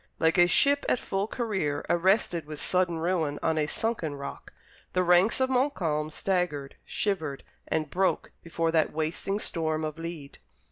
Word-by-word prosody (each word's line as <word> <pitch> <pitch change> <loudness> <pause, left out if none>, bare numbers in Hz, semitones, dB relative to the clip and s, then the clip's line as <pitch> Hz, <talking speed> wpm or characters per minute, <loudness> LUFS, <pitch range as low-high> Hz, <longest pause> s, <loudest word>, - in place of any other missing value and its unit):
Like 165 +2 +2
a 175 - +7
ship 285 +9 +4
at - - +3
full 195 -3 -2
career 190 - -2
arrested 175 -3 +2
with 150 -1 -7
sudden 180 -1 +1
ruin 160 -3 0
on 160 -1 +1
a 150 - +1
sunken 175 -8 -2
rock, 140 0 -8 0.4
the 185 - +2
ranks 180 +6 +4
of 260 - +3
Montcalm 190 - 0
staggered, 155 -5 -1
shivered, 160 -9 -2 0.2
and 155 -1 0
broke 185 +6 0
before 165 0 -1
that 160 -1 +2
wasting 160 +6 -2
storm 160 -5 -2
of 155 +1 -5
lead. 165 -4 -7
170 Hz, 155 wpm, -28 LUFS, 155-195 Hz, 0.4 s, a